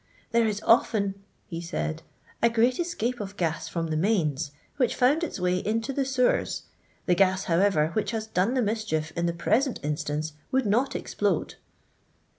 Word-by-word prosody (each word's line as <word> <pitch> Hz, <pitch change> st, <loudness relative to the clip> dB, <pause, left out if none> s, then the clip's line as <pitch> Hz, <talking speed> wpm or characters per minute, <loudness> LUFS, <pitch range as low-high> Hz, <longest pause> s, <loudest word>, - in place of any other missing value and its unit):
" -, -, -32 dB
There 230 Hz, -1 st, +3 dB
is 210 Hz, -1 st, -2 dB
often/' 210 Hz, -3 st, +3 dB, 0.3 s
he 165 Hz, -1 st, -6 dB
said, 80 Hz, -, -3 dB, 0.2 s
" -, -, -29 dB
a 235 Hz, -, +5 dB
greftt 235 Hz, +2 st, +2 dB
escape 255 Hz, -9 st, -1 dB
of 205 Hz, -1 st, -6 dB
gas 160 Hz, -3 st, -1 dB
from 165 Hz, -1 st, -3 dB
the -, -, 0 dB
mains, 160 Hz, -5 st, +1 dB, 0.3 s
which 250 Hz, -4 st, +2 dB
found 285 Hz, +7 st, +3 dB
its 315 Hz, -, -3 dB
way 180 Hz, 0 st, +1 dB
into 225 Hz, +6 st, -1 dB
the 275 Hz, 0 st, 0 dB
sew 260 Hz, -1 st, +3 dB
ers. -, -, -1 dB, 0.4 s
The 180 Hz, -, +3 dB
gas, 190 Hz, +1 st, +3 dB
however, 170 Hz, -3 st, +3 dB
which 215 Hz, -, 0 dB
has 225 Hz, -2 st, -2 dB
done 220 Hz, +3 st, 0 dB
the 255 Hz, -, +2 dB
mischief 205 Hz, -8 st, -1 dB
in 170 Hz, 0 st, 0 dB
the -, -, +1 dB
present 230 Hz, +10 st, +1 dB
instance 150 Hz, +1 st, -2 dB, 0.2 s
would 265 Hz, -1 st, +2 dB
not 250 Hz, +6 st, +1 dB
explode.' 200 Hz, -6 st, -1 dB
205 Hz, 185 wpm, -27 LUFS, 170-235 Hz, 0.4 s, a